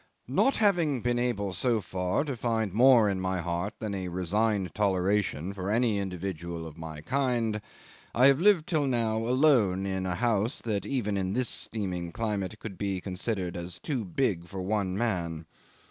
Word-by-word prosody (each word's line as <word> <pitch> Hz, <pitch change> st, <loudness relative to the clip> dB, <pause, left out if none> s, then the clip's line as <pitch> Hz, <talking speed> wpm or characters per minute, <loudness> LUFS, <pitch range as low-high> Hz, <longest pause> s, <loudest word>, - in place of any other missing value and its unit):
"Not 270 Hz, -, +3 dB
having 170 Hz, -, +2 dB
been 120 Hz, 0 st, +1 dB
able 100 Hz, -6 st, -1 dB
so 120 Hz, +2 st, +1 dB
far 90 Hz, +4 st, -1 dB
to 140 Hz, -4 st, -3 dB
find 110 Hz, -4 st, -1 dB
more 120 Hz, -1 st, +6 dB
in 95 Hz, -2 st, -1 dB
my 95 Hz, 0 st, -1 dB
heart 85 Hz, +4 st, -2 dB
than 105 Hz, -2 st, -4 dB
a 95 Hz, -2 st, -3 dB
resigned 95 Hz, +1 st, 0 dB
toleration 95 Hz, -3 st, 0 dB
for 95 Hz, 0 st, -4 dB
any 110 Hz, -1 st, +2 dB
individual 85 Hz, -3 st, -4 dB
of 80 Hz, -2 st, -9 dB
my 80 Hz, -2 st, -7 dB
kind, 120 Hz, -, 0 dB, 0.5 s
I 125 Hz, -, +5 dB
have 140 Hz, 0 st, +6 dB
lived 185 Hz, -4 st, +5 dB
till 155 Hz, -6 st, +1 dB
now 115 Hz, -4 st, +1 dB
alone 115 Hz, -6 st, +3 dB
in 95 Hz, -1 st, -2 dB
a 90 Hz, -, -1 dB
house 115 Hz, +2 st, +1 dB
that 105 Hz, -3 st, -2 dB
even 105 Hz, -7 st, -1 dB
in 95 Hz, 0 st, -1 dB
this 125 Hz, +1 st, 0 dB
steaming 90 Hz, -6 st, -3 dB
climate 105 Hz, -1 st, -2 dB
could 105 Hz, -4 st, -8 dB
be 100 Hz, -2 st, -1 dB
considered 95 Hz, 0 st, -3 dB
as 85 Hz, 0 st, -5 dB
too 130 Hz, -, -3 dB
big 90 Hz, -3 st, -1 dB
for 95 Hz, +1 st, -5 dB
one 95 Hz, -1 st, -1 dB
man. 85 Hz, -8 st, -2 dB
100 Hz, 175 wpm, -28 LUFS, 90-120 Hz, 0.5 s, more